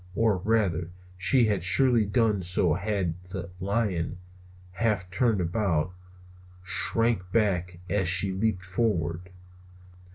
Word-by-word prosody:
Or 110 -3 +2
rather, 95 -4 0 0.3
she 110 +7 +3
had 105 -4 0
surely 120 +4 +4
done 110 -2 +1
so 90 -2 +1
had 95 -1 -2
not - - -20
the 90 -2 -7
lion, 100 -5 -1 0.5
half 95 -1 -1
turned 110 +1 +1
about, 90 -2 -1 0.7
shrank 100 0 +1
back 90 -5 0
as 95 -1 0
she 95 +2 +4
leaped 95 -1 -1
forward. 90 -4 -2
95 Hz, 120 wpm, -26 LUFS, 90-110 Hz, 0.7 s, surely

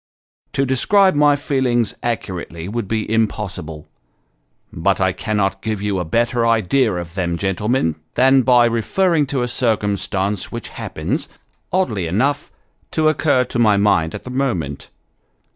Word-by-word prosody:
To 135 - +1
describe 190 +10 +3
my 145 0 +4
feelings 130 -5 0
accurately, 90 -7 -4
would 110 0 -3
be 110 +1 -2
impossible; 100 -8 -2 0.9
but - - +1
I - - +2
cannot 95 -2 -1
give 110 -1 -2
you 100 -1 -1
a 90 - -2
better 115 +7 +1
idea 115 0 +2
of 85 -1 -6
them, 85 -2 -2
gentlemen, 95 - 0 0.2
than 135 +1 +5
by 125 -1 +5
referring 150 - +1
to 135 -2 -1
a - - -1
circumstance 105 -4 -1
which - - -6
happens, - - -4 0.4
oddly 110 - 0
enough, 135 - 0 0.4
to 155 -1 +2
occur 145 -4 +2
to 120 -1 -4
my 105 -3 +4
mind 90 -5 +2
at - - -8
the 125 - -8
moment. 95 - -2
115 Hz, 145 wpm, -19 LUFS, 95-130 Hz, 0.9 s, than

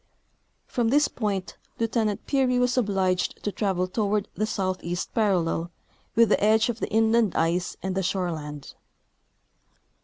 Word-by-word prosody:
From 240 -3 -1
this 290 +5 +4
point 200 -5 -3 0.2
Lieutenant 225 -2 -1
Peary 260 -3 +2
was 250 0 +2
obliged 195 -6 0
to 205 - -1
travel 190 -3 0
toward 205 +1 -1
the 215 - -1
south 185 -3 -2
east 175 +1 -4
parallel 175 -6 +1 0.5
with 230 -1 +5
the - - +2
edge 220 +2 +4
of 235 -1 -3
the - - -3
inland 225 -1 +3
ice 170 +2 0
and 190 0 -1
the 190 - 0
shore 185 -1 -1
land. 150 -3 -7
205 Hz, 150 wpm, -26 LUFS, 185-225 Hz, 0.5 s, with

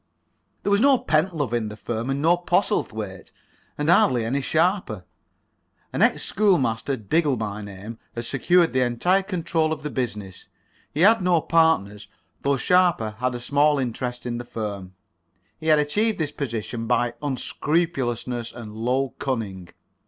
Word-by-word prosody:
There 200 - 0
was 200 +1 +4
no 275 0 +6
Pentlove 155 - 0
in 115 -2 0
the 105 - -7
firm, 115 +2 -4
and 140 +2 -1
no 170 +2 +5
Postlethwaite, 120 - -1 0.5
and 150 - -2
hardly 130 -8 +4
any 135 +5 -1
Sharper. 160 - 0 0.9
An - - -1
ex - - +3
schoolmaster, 140 - +1
Diggle 140 - +1
by 105 -1 -4
name, 105 +3 -9 0.2
had 120 0 -3
secured 170 +7 +2
the 130 - +2
entire 130 +11 +2
control 170 -4 -1
of 155 -2 -4
the 150 - -4
business. 105 -7 -5 0.4
He 150 - -2
had 220 +3 +6
no 180 -2 +3
partners, 150 -13 +1 0.3
though 140 0 +1
Sharper 175 -9 +2
had 125 0 -1
a - - -4
small 145 +4 +2
interest 125 -1 -3
in 120 -1 -3
the - - -5
firm. 100 -5 -6 0.6
He 160 - -6
had 155 -1 +6
achieved 205 +10 +1
this 155 -3 -2
position 115 -3 -4
by 120 0 +1
unscrupulousness 130 -4 -1
and 110 -3 -9
low 125 +4 0
cunning. 105 -9 -3
130 Hz, 150 wpm, -24 LUFS, 115-165 Hz, 0.9 s, no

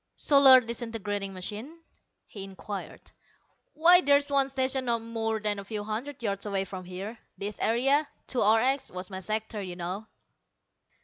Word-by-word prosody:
"Solar 275 -3 +7
disintegrating 225 -4 -4
machine?" 210 - -7 0.5
he 200 - -9
inquired. 195 +1 -8 0.6
"Why 350 +4 +7
there's 285 -2 +3
one 275 -1 +2
stationed 260 -1 0
not 230 -1 0
more 225 -1 -2
than 210 -1 -1
a - - -7
few 210 +1 -5
hundred 235 +5 -5
yards 200 -1 -2
away 195 -1 -1
from 185 -1 -8
here. 195 +5 -7 0.2
This 205 +1 -5
area, 270 +6 +2 0.2
2 250 - -1
RX, 235 +6 +3
was 185 +1 -6
my 190 - -4
sector, 215 +2 -3
you 180 -2 -6
know." 185 +5 -5
220 Hz, 150 wpm, -28 LUFS, 200-260 Hz, 0.6 s, Solar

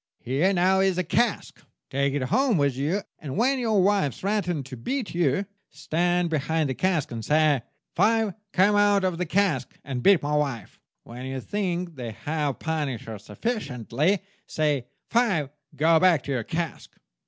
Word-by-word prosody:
Here 140 +10 +1
now 190 +1 +3
is 190 -2 +2
a 185 - +1
cask. 230 +6 -1 0.3
Take 140 +1 0
it 140 - -1
home 245 - +2
with 140 -3 +1
you, 160 +10 -1 0.2
and 145 +1 -6
when 260 +4 +2
your 220 -6 +2
wife 195 -8 +2
threatens 180 -8 -1
to - - -5
beat 235 - -3
you, 170 +2 +1 0.2
stand 175 +1 0
behind 155 -1 0
the - - -1
cask 175 -3 0
and 115 -1 -5
say, 150 0 +3 0.3
'Five, 220 +1 +2 0.2
come 200 +2 +4
out 205 -1 +4
of 180 -2 -1
the 180 - -1
cask 170 -9 0
and 130 -3 -4
beat 195 +3 +5
my 150 +1 0
wife!' 135 -8 -2 0.2
When 125 +2 -8
you 135 0 -4
think 180 0 -3
they 120 -3 -5
have 145 +4 -2
punished 150 -8 -3
her 110 -2 -7
sufficiently, 150 - -1 0.2
say, 145 -5 0 0.2
'Five, 190 - +2 0.2
go 160 +1 +4
back 175 -6 +4
to - - -5
your 125 -4 -1
cask! 165 -1 -4
160 Hz, 170 wpm, -25 LUFS, 140-195 Hz, 0.3 s, beat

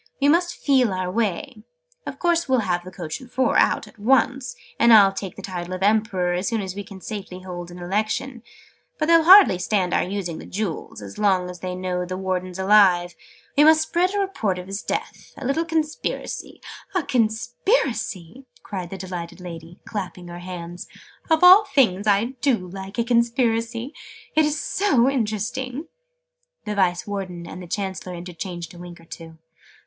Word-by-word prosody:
We 285 +1 +3
must 345 +3 +2
feel 260 -7 +2
our 185 -1 -2
way. 215 +3 -2 0.5
Of - - -5
course 340 -4 +1
we'll 260 -2 +3
have 175 -3 -1
the 180 - -9
coach 170 -1 -6
and 250 -1 -14
four 260 -1 +1
out, - - +3
at 225 - -18
once. 255 +2 +2 0.2
And 235 - +6
I'll 200 -3 +8
take 195 -2 -6
the 195 - -10
title 180 -1 -5
of 185 - -4
Emperor, 205 -4 +2
as 180 +2 -1
soon 230 -2 0
as 190 -2 -4
we 205 +1 -6
can 195 -2 -12
safely 195 -3 -7
hold 175 -1 -7
an 175 - -10
Election. 215 +7 -2 0.6
But 305 - 0
they'll 330 0 +5
hardly 365 - +8
stand 185 -1 0
our - - +3
using 180 -3 -4
the - - -10
Jewels, 190 - -4
as 100 -1 -9
long 190 -3 +2
as 180 - -11
they 180 +1 -4
know 180 -1 -2
the 185 +1 -5
Warden's 185 -1 -3
alive. 190 -3 +4 0.4
We 290 - +6
must 315 0 +6
spread 360 +5 0
a - - +1
report 230 - -1
of 180 - -7
his 195 +2 -5
death. - - -5
A 275 - -7
little 275 +6 0
Conspiracy 320 -2 -3 0.2
" - - -21
"A 365 - +2
Conspiracy!" 240 - -1 0.2
cried 185 -4 -5
the 195 - -6
delighted 180 -2 -6
lady, 170 -1 -9
clapping 180 -4 -6
her 175 0 -8
hands. 175 -1 -7 0.4
"Of 320 +1 +3
all 375 +4 +9
things, 220 -8 +2
I 210 +5 +2
do 275 -3 +4 0.2
like 195 +2 -8
a 235 - +2
Conspiracy! 235 +1 0 0.4
It's 300 -1 +2
so 280 -12 +2
interesting!" 255 - -2 0.8
The 210 - -2
Vice 180 -3 +1
Warden 185 -4 -5
and 180 - -8
the 180 - -9
Chancellor 190 -1 -4
interchanged 175 -1 -7
a 175 - -12
wink 175 -1 -10
or 165 - -17
two. 165 -1 -11
200 Hz, 185 wpm, -23 LUFS, 180-255 Hz, 0.8 s, all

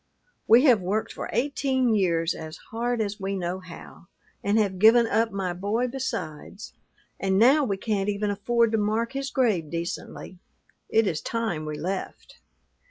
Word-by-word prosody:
We 235 +4 +7
have 245 -9 +5
worked 200 +5 -2
for - - -6
eighteen 260 -1 +1
years 170 -5 +1
as 160 0 -8
hard 235 +1 -1
as 205 -1 -3
we 195 0 -3
knew 180 0 -3
how, 175 -1 -12 0.4
and 205 +2 +2
have 195 -4 0
given 230 +3 +6
up 225 0 +1
my 190 -2 -2
boy 210 +7 -1
besides; 195 - -6 0.5
and 190 -1 +1
now 265 +8 +5
we 200 -5 -1
can't 205 -1 -1
even 205 0 -1
afford 230 +3 +1
to 220 - +1
mark 220 +4 -1
his 275 0 -3
grave 215 - +1
decently. 170 +2 -6 0.5
It 225 0 +3
is 165 -6 -1
time 220 -10 -3
we 150 -1 -4
left.' 185 +5 -5
205 Hz, 165 wpm, -25 LUFS, 185-230 Hz, 0.5 s, We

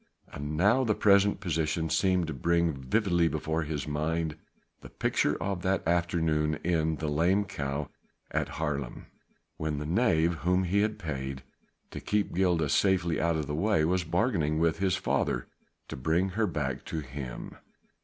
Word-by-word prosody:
And 75 +2 -5
now 105 +10 +4
the 110 -4 +1
present 100 -1 +4
position 80 -2 -1
seemed 90 +1 +2
to 80 - -4
bring 85 +4 +1
vividly 85 - +1
before 80 +1 -1
his 75 -1 -3
mind 80 +1 -1 0.5
the - - -11
picture - - 0
of 95 -2 -2
that 95 -2 0
afternoon 80 -3 +1
in 80 -2 +1
the 75 +1 -4
"Lame 85 +7 +2
Cow" 70 -6 -3 0.4
at - - 0
Haarlem, 70 -5 -3 0.5
when 80 -1 -2
the 75 - -4
knave 85 -3 +2
whom 90 +3 +1
he 95 +3 +1
had 105 0 0
paid 65 -6 -5 0.5
to - - -6
keep 105 -1 -1
Gilda 85 -3 +2
safely 90 -3 +2
out 85 0 +2
of 80 -1 -1
the 75 - -4
way 85 0 +2
was 90 +2 +1
bargaining 80 - 0
with 80 0 +1
his 95 -1 +2
father 60 -8 0 0.4
to - - -6
bring 80 +8 +1
her 105 +3 0
back 75 -7 -3
to 80 - -3
him. 65 -2 -7
80 Hz, 165 wpm, -29 LUFS, 75-95 Hz, 0.5 s, now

